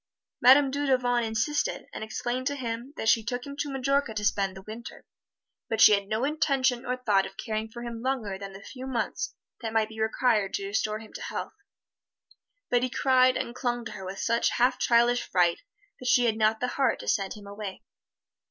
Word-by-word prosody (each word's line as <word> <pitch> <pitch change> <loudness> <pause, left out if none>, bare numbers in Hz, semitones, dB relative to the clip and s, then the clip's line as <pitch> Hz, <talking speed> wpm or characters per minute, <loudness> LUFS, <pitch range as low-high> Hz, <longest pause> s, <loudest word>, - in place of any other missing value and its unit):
Madame 265 +2 +7
Dudevant 255 -4 +1
insisted, 230 +7 -1
and - - -5
explained 240 +4 -3
to 285 - -1
him 240 0 -4
that 220 - -3
she 225 0 +4
took 245 +2 -3
him 280 0 -7
to 290 0 -2
Majorca 275 -3 0
to 210 -1 -2
spend 195 -2 0
the 190 - -10
Winter, 220 +3 -9 0.6
but 225 - -1
she 215 - +9
had 200 -1 +1
no 215 +4 -1
intention 270 -4 +1
or 250 0 -1
thought 205 -6 +2
of 195 - -15
caring 220 0 -3
for 235 +2 -8
him 235 -1 -6
longer 245 -6 -2
than 195 0 -7
the 195 +1 -11
few 260 0 -8
months 240 -4 -2 0.3
that 225 -2 -4
might 220 -1 +2
be 220 0 -7
required 220 -2 +1
to 195 - -3
restore 215 +1 -1
him 220 0 -13
to - - -7
health. - - -5 1.2
But 245 -1 +4
he 255 - 0
cried 255 0 +3
and 235 - -3
clung 240 -2 -2
to - - -6
her 190 - -8
with 190 +1 -6
such 230 +3 +1
half 250 +1 +2
childish 240 0 +4
fright 175 -2 +2 0.4
that 255 - -6
she 245 - +5
had 225 -2 +2
not 220 0 +2
the 250 - 0
heart 265 -1 +1
to - - -10
send 195 -1 0
him 210 -1 -12
away. 200 -1 -7
235 Hz, 205 wpm, -27 LUFS, 215-255 Hz, 1.2 s, she